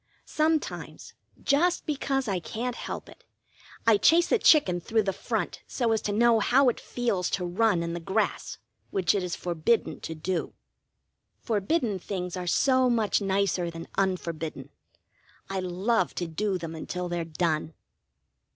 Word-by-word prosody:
Sometimes, 310 0 -2 0.3
just 340 +5 +2
because 270 -3 -1
I 195 -3 0
can't 235 +7 -4
help - - -6
it, - - -16 0.6
I 225 -2 +6
chase 335 - +4
a 470 - +4
chicken 185 - +5
through 220 +4 +1
the 195 -1 -1
front - - -3
so 235 -3 0
as 220 -1 +1
to 205 - -2
know 230 +2 +4
how 255 +5 +4
it 240 - -3
feels 225 -7 -1
to 180 - -1
run 180 0 +2
in 170 0 -3
the 170 - -3
grass, 195 +6 -1 0.3
which 190 -2 +1
it 200 - 0
is 180 -1 -3
forbidden 175 +6 0
to 160 - -6
do. 170 +3 -3 0.8
Forbidden 220 - 0
things 180 -1 -4
are 180 -1 -5
so 260 +5 +3
much 225 -3 +2
nicer 195 -3 0
than 165 0 -8
unforbidden. 170 -5 -2 0.8
I 195 - -1
love 185 +2 0
to 175 - -2
do 190 +4 -1
them 165 -2 -6
until 180 +3 -4
they're 175 -1 -2
done. 160 -1 -1
195 Hz, 155 wpm, -27 LUFS, 175-235 Hz, 0.8 s, I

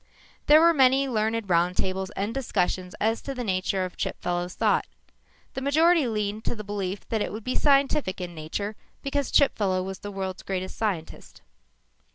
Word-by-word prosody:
There 300 +1 +8
were 335 +1 +6
many 270 -1 +4
learned 225 -2 0
roundtables 185 +2 +1
and 205 +3 -2
discussions 185 -8 -1
as 225 +2 +1
to 275 - -5
the 250 - -3
nature 185 -2 0
of 180 - -9
Chipfellow's 175 0 -3
thought. - - +2 0.7
The 265 - -4
majority 315 +2 +4
leaned 210 -1 -2
to - - -1
the 215 - -7
belief 200 -1 -4
that 220 -2 0
it - - -2
would 215 +1 -6
be 255 - -2
scientific 275 -8 +2
in 180 -1 -5
nature 170 +7 -4 0.3
because 280 -1 -1
Chipfellow 195 -9 +3
was 190 0 -6
the 205 - -7
world's 190 -1 -4
greatest 185 -1 -4
scientist. 190 -8 -4
205 Hz, 170 wpm, -26 LUFS, 185-265 Hz, 0.7 s, There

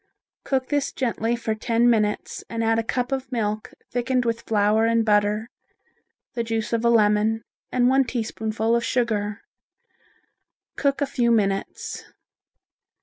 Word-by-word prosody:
Cook 260 -1 -1
this 290 -2 0
gently 235 -2 -1
for 230 -2 -2
ten 230 +2 +1
minutes 215 -3 0
and 230 0 -2
add 225 0 +2
a - - 0
cup 250 +3 -2
of 265 -1 -3
milk 215 -3 -2 0.2
thickened 250 0 0
with 230 0 -1
flour 215 +1 +2
and 230 -1 +2
butter, 210 +1 +2 0.8
the 235 - -1
juice 225 0 -2
of 230 0 +1
a 235 - +4
lemon 220 0 +3 0.3
and 245 -1 +3
one 265 +1 +4
teaspoonful 225 -1 -1
of 235 - +1
sugar. 215 -5 -1 1.3
Cook 280 -1 0
a - - +3
few 240 -3 0
minutes. 195 -4 -1
230 Hz, 145 wpm, -24 LUFS, 215-245 Hz, 1.3 s, a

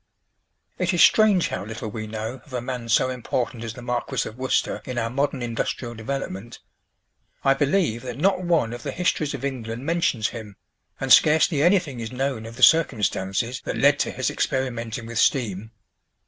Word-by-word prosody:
It 185 - +1
is 170 - +6
strange 210 -5 +5
how - - -4
little 110 +1 -6
we 110 +1 -5
know 110 +4 -5
of 145 - -17
a 125 - -1
man 120 -1 -5
so 130 +3 +3
important 120 -1 -3
as 115 0 -6
the 125 - -10
Marquis 120 -1 -2
of 110 - -9
Worcester 130 +1 -1
in 125 -1 -6
our 115 -1 -1
modern 140 -1 -1
industrial 120 +1 -3
development. 115 -2 -5 0.9
I 135 - +5
believe 140 - +1
that 125 -2 -6
not 185 +4 +2
one 165 -10 +1
of 120 - -7
the - - -4
histories 155 -4 0
of 135 0 -5
England 120 -2 -4
mentions 165 -9 +1
him, 105 -4 -9 0.4
and - - +4
scarcely 155 -1 +5
anything 170 -6 +2
is 115 -1 -5
known 130 -3 -2
of 115 - -10
the 130 - -3
circumstances 115 - +2
that - - -3
led - - +4
to - - +1
his - - -1
experimenting 120 -3 -2
with 115 0 -3
steam. 110 -8 +1
125 Hz, 180 wpm, -24 LUFS, 115-140 Hz, 0.9 s, is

